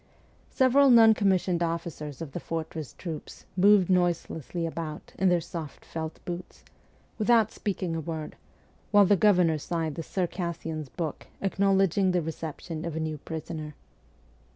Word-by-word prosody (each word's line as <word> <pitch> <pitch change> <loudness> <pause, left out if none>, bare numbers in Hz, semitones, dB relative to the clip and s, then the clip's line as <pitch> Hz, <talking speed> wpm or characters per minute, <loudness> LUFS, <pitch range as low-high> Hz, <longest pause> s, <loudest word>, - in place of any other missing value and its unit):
Several 270 +2 +5
non 225 -2 +8
commissioned 190 -4 +1
officers 165 -3 -3
of 150 - -8
the 175 - -4
fortress 160 -4 -5
troops 165 -4 -8
moved 195 0 +5
noiselessly 175 -2 0
about 160 -2 -6
in 190 - +4
their 175 -1 +3
soft 160 -2 -7
felt 160 -1 -5
boots, 175 0 -7 0.6
without 225 0 +4
speaking 185 -4 -3
a 165 - -2
word, 160 -1 -5 0.5
while 205 -1 +6
the 205 - +5
governor 180 -6 +4
signed 165 0 -2
the 165 - -5
Circassian's 165 -4 -3
book 160 +2 -5
acknowledging 195 -1 +2
the 180 - +2
reception 160 0 -5
of 170 -2 -4
a - - -2
new 155 -1 -3
prisoner. 155 -1 -6
170 Hz, 140 wpm, -28 LUFS, 160-190 Hz, 0.6 s, non